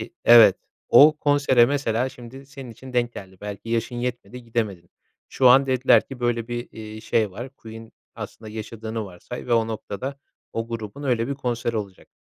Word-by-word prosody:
i - - -7
Evet, 115 -5 +8 0.3
o 150 +2 +7
konsere 140 -5 +4
mesela 130 -3 0
şimdi 130 +1 -12
senin 135 -3 -10
için 130 +3 -12
denk 120 -1 0
geldi. 95 -1 -11
Belki 105 +1 -7
yaşın 115 +1 -1
yetmedi 125 0 -5
gidemedin. 105 -7 -3 0.4
Şu 130 - +4
an 135 +2 +6
dediler 130 0 +4
ki 135 -2 -9
böyle 120 -1 -1
bir, 120 0 -4
iii, 110 0 -9
şey 110 -2 +1
var. 120 +8 -8
Queen 115 0 -11 0.2
aslında 110 - -9
yaşadığını 110 0 -6
varsay 95 +6 -9
ve 120 - -1
o 115 -1 +3
noktada 115 +5 -5 0.3
o 115 0 -3
grubun 115 +3 -6
öyle 120 -3 0
bir 140 - -2
konseri 120 -3 -2
olacak. 100 -3 -6
120 Hz, 175 wpm, -23 LUFS, 110-130 Hz, 0.4 s, Evet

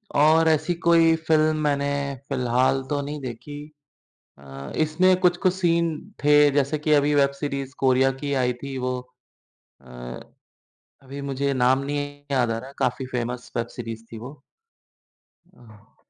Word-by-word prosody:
और 160 +2 +5
ऐसी 155 +2 +1
कोई 165 -1 +5
फिल्म 155 -1 +3
मैंने 140 -1 +1 0.4
फिलहाल 130 0 +1
तो 145 -1 0
नहीं 145 +1 -5
देखी। 130 +4 -7 0.8
अ, 70 0 -10
इसमें 180 +4 +3
कुछ-कुछ 180 +1 +3
सीन 170 -2 +1 0.3
थे 150 0 +6
जैसे 140 +2 0
कि 150 +1 0
अभी 145 0 +4
वेब 140 -1 +4
सीरीज़ 140 -2 -4
कोरिया 130 0 +3
की 145 -1 -2
आई 125 - +1
थी 140 -1 -5
वो 125 0 -2 0.8
अ, - - -23 1.2
अभी 135 +2 -9
मुझे 140 0 -1
नाम 130 +1 +3
नहीं 145 0 -4
याद 125 -4 +2
आ 115 - -1
रहा 130 - -8
है। 135 - -13
काफ़ी 125 +2 -1
फेमस 125 0 -4
वेब 115 0 -1
सीरीज़ 115 -2 -6
थी 115 - -7
वो। 130 +5 -10 1.2
अह 110 -4 -20
140 Hz, 150 wpm, -24 LUFS, 125-150 Hz, 1.2 s, थे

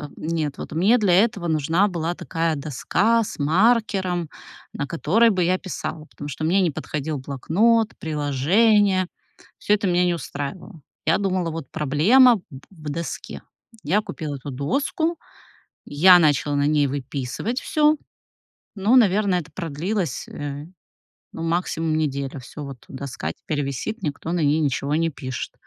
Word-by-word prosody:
Нет, 155 -3 -3
вот - - -7
мне 190 +10 +4
для 195 -4 +3
этого 200 -6 -2
нужна 160 +5 +2
была 170 -2 -2
такая 165 -2 -2
доска 180 - +1
с 205 - -8
маркером, 185 0 +2 0.4
на 145 - -3
которой 205 +8 +3
бы 185 -3 +1
я 185 +2 +2
писала, 165 -4 -6
потому 145 - -9
что 145 +2 -6
мне 185 +5 +3
не 180 - +2
подходил 150 +1 -4
блокнот, 205 - +1
приложения, 185 - +2 0.5
всё 205 - +1
это 205 -2 +1
меня 180 0 +3
не 175 - +2
устраивало. 160 +4 -6 0.3
Я 160 - +4
думала: 185 -4 -1
"Вот 160 -4 -7
проблема 205 - +5
в 200 - -7 0.3
в 155 -6 -9
доске." 165 +3 -5 0.4
Я 190 +9 +2
купила 160 -8 -6
эту 140 +1 -7
доску, 275 - -1 0.7
я 180 +5 +6
начала 145 -2 +2
на 145 - +2
ней 150 -1 +3
выписывать 140 - -3
всё. 305 0 +3 0.8
Ну, 205 +5 +3
наверное, 200 -5 +4
это 165 -1 -10
продлилось, 170 - -3
э, 145 0 -6 0.7
ну, 165 - -6
максимум 165 -2 -1
неделю, 140 -2 -2
Всё, 145 +4 -9
вот 135 -3 -10
доска 130 - -5
теперь 145 - -4
висит, 140 - -4
никто 150 +2 -3
на 175 - 0
ней 145 +2 +3
ничего 145 -1 -1
не 165 +1 +1
пишет. 130 -4 -6
165 Hz, 150 wpm, -23 LUFS, 145-195 Hz, 0.8 s, я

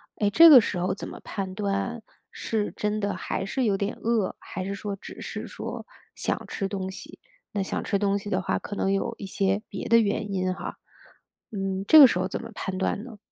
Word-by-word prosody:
哎， 205 -1 +1
这 330 +8 +9
个 270 -5 +11
时 195 -4 -1
候 180 - 0
怎 - - -6
么 - - -9
判 190 -2 -4
断 205 +3 -2 0.3
是 215 -2 -2
真 210 0 -1
的 200 -1 -1
还 195 - -3
是 260 +6 -1
有 205 -4 +2
点 200 +2 -2
饿， 225 -3 0
还 185 0 -6
是 200 - -3
说 200 0 -4
只 - - -11
是 - - -5
说 - - -6 0.3
想 - - -2
吃 195 - -3
东 190 -1 -4
西？ 190 - -10 0.3
那 205 - -1
想 190 - -3
吃 200 - 0
东 200 -1 +1
西 205 - -8
的 185 - +1
话， - - 0
可 205 - -6
能 195 - 0
有 195 +4 0
一 200 - -6
些 195 +2 0
别 - - -5
的 230 0 +6
原 205 -1 0
因 185 -1 0
哈。 - - -7 0.7
嗯， 195 -2 -3
这 315 - +8
个 280 - +12
时 180 - 0
候 185 - 0
怎 190 - -4
么 230 - -8
判 190 -2 -4
断 195 +2 -1
呢？ 225 -5 -11
200 Hz, 245 characters per minute, -26 LUFS, 195-215 Hz, 0.7 s, 个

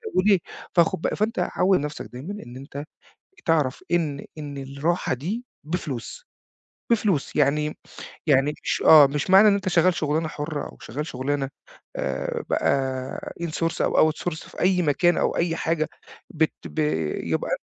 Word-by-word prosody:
وليه؟ 195 0 +4 0.4
فخد 170 -2 +3
ب - - +1
فأنت 215 -1 -1 0.2
عوّد 185 0 +4
نفسك 150 +1 -5
دايمًا 175 +12 -6
إن 120 +1 -10
أنت 140 +1 -7 0.6
تعرف 150 -6 +1
إن 155 -5 0
إن 145 -2 -6
الراحة 140 +5 -1
دي 190 - -4 0.2
بفلوس. 160 - -5 0.6
بفلوس، 210 - +1
يعني 150 +2 +2 0.5
يعني 140 0 +4
مش - - -1
آه، 150 -3 +9
مش 145 +5 -3
معنى 195 +3 +8
إن 205 - +6
أنْتَ 195 -2 -1
شغال 175 +1 +4
شغلانة 155 0 0
حرة، 150 -1 -4
أو - - -9
شغال 145 +6 -4
شغلانة 135 +1 -2 0.5
آآ - - -2
بقى 130 -1 -1
in - - 0
source 165 +1 -1
أو 155 - +4
out - - -11
source 160 -2 -5
في - - -11
أي 180 -1 +3
مكان، 175 +3 +3
أو - - +1
أي 170 -1 +1
حاجة، 160 -1 0 0.4
بت 160 0 +1
ب 75 -3 -5 0.4
يبقى - - -1
155 Hz, 155 wpm, -24 LUFS, 140-175 Hz, 0.6 s, آه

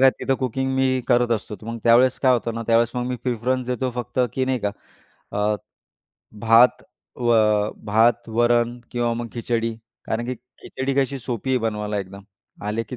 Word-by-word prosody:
काय, 135 0 +7
तिथं 135 - +1
कुकिंग 130 +1 -1
मी 130 -1 +2
करत 120 -1 +3
असतो. 105 -1 -3
तर 110 - -14
मग 115 0 -4
त्यावेळेस 120 +2 +5
काय 130 -2 +4
होतं 120 -2 -1
ना, 115 - -3
त्यावेळेस 115 0 +3
मग 125 0 -2
मी 125 0 -2
प्रिफरन्स 125 +1 -1
देतो 125 +1 -1
फक्त 125 0 -5 0.2
की 130 - +1
नाही 130 -1 0
का, 105 - 0 0.6
अ, 105 +1 +1 0.8
भात 115 +2 +5 0.3
व 120 -1 +1 0.5
भात, 110 +3 +2
वरण 120 +1 +2
किंवा 120 -1 0
मग 120 0 -4
खिचडी. 115 -1 -1 0.3
कारण 115 +2 -2
की 130 - -2 0.3
खिचडी 135 +1 -3
कशी 140 0 +1
सोपी 125 0 -4
आहे 130 - +3
बनवायला, 105 -2 -2
एकदम 100 +1 -7 0.4
आले 105 +2 -1
की 125 - -6
120 Hz, 180 wpm, -23 LUFS, 115-130 Hz, 0.8 s, काय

